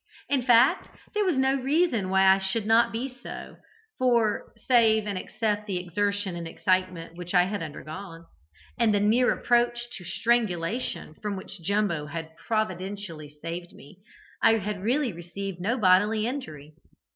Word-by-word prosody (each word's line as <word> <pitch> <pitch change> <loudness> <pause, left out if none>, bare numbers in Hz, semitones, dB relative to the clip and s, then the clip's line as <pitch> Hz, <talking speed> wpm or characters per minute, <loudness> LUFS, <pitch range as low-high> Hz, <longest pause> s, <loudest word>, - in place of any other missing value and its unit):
In 280 -2 +2
fact, 245 +1 +4 0.2
there 420 -1 +1
was 365 -6 +1
no 265 0 +3
reason 270 - +1
why 190 0 +4
I 190 0 +6
should 195 +3 -1
not 225 +2 +4
be 235 +4 -2
so, - - -8 0.4
for, 235 -4 +2 0.2
save 225 -4 +4
and 205 -1 -3
except 210 +2 -2
the 190 -3 -1
exertion 200 +1 -1
and 170 -1 -5
excitement 185 -1 -1
which 180 +1 -6
I 180 - +7
had 200 +1 -3
undergone, 165 +2 -8 0.5
and 225 -3 +3
the - - +3
near 225 +5 +3
approach 240 0 +1
to 185 - -11
strangulation 205 -1 -1
from 210 -1 -2
which 190 0 -9
Jumbo 195 -5 0
had 160 +1 -7
providentially 190 -7 -3
saved 170 +1 -5
me, 160 +6 -15 0.4
I 225 - +6
had 205 -1 -4
really 245 +2 +1
received 175 +2 -6
no 230 +7 0
bodily 210 +1 +4
injury. 155 - -6
205 Hz, 155 wpm, -27 LUFS, 180-235 Hz, 0.5 s, I